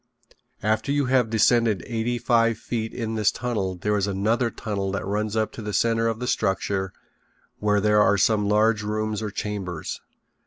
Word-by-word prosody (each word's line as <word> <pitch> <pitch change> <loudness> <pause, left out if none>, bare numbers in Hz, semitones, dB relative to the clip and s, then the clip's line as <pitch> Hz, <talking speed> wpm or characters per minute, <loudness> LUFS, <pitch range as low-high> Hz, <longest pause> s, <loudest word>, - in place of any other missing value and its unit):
After 110 +6 0
you 145 -1 +1
have 125 -3 +2
descended 110 -3 +3
eighty 120 +1 -2
five 115 -2 +2
feet 110 -1 -4
in 115 -2 -4
this 110 -2 +2
tunnel 105 -7 -2
there 105 +4 -1
is 100 -1 0
another 110 +5 +1
tunnel 100 -3 -3
that 100 - -3
runs 105 +2 -2
up 110 -1 0
to - - -8
the 105 -1 -5
center 115 +1 +2
of 115 -1 -1
the 125 - -3
structure 95 -4 -1 0.7
where 105 -1 +2
there 105 +1 +4
are 100 -1 +4
some 105 +1 +2
large 105 +1 +3
rooms 110 0 -2
or 110 - -3
chambers. 100 -5 -5
110 Hz, 180 wpm, -24 LUFS, 100-115 Hz, 0.7 s, there